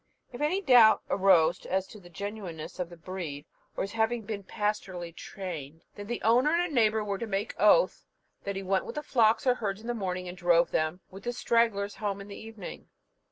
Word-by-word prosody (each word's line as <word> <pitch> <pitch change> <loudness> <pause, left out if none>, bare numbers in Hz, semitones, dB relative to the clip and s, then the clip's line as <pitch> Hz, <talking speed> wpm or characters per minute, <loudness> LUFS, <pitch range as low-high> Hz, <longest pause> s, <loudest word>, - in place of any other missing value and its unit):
If 245 - -7
any 340 +7 +1
doubt 245 - +7
arose 180 -4 +4
as 190 +1 0
to 215 - -11
the 175 -2 -15
genuineness 185 -4 -7
of 180 -2 -2
the 175 - -12
breed, 165 -5 -6 0.3
or - - 0
his 195 - -5
having 225 +1 0
been 205 -1 -5
pastorally 190 -4 -3
trained, 160 -7 -7
then 205 0 -9
the 240 +1 -4
owner 245 +6 +4
and 350 -1 0
a - - -7
neighbour 220 -3 +3
were 200 -2 -3
to 230 - -4
make 205 +1 -2
oath - - +4 0.4
that 200 - -3
he 195 - -4
went 190 0 0
with - - -6
the 300 - -3
flocks 225 -4 +3
or 250 - +5
herds 205 -4 -3
in - - -13
the 240 - -1
morning, 185 -4 -3
and 175 - -6
drove 175 -1 +3
them, 155 +3 0
with 195 +1 -10
the 240 +4 -3
stragglers, 230 -4 +1
home 200 -2 -2
in 200 +1 -10
the 200 - -7
evening." 220 -4 -9
200 Hz, 215 wpm, -29 LUFS, 180-225 Hz, 0.4 s, doubt